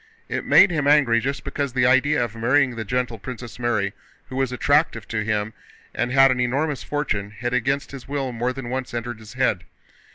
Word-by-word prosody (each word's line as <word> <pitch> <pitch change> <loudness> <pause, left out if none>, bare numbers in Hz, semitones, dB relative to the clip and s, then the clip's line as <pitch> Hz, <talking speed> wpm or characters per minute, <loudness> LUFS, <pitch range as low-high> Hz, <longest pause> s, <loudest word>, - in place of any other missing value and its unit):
It - - -3
made - - +6
him 150 -4 0
angry 140 -6 +5
just 135 +4 -3
because 140 -2 -3
the 125 -1 +2
idea 130 +1 +3
of 115 - -10
marrying 125 +3 +2
the 115 - -4
gentle 125 0 -2
Princess 125 +2 -8
Mary, 110 -4 0 0.4
who 130 - -7
was 135 -1 0
attractive 145 -1 +1
to 110 -2 -1
him 105 0 -1 0.4
and 120 - -1
had 135 0 +6
an 125 - -1
enormous 135 +4 0
fortune, 110 -9 -2
had 120 +4 -4
against 135 +2 0
his 135 -3 -9
will 135 -2 -2
more 120 +1 -1
than 130 -2 -6
once 130 -2 -4
entered 120 -1 -4
his 110 +1 -12
head. 130 -8 0
125 Hz, 200 wpm, -23 LUFS, 115-135 Hz, 0.4 s, made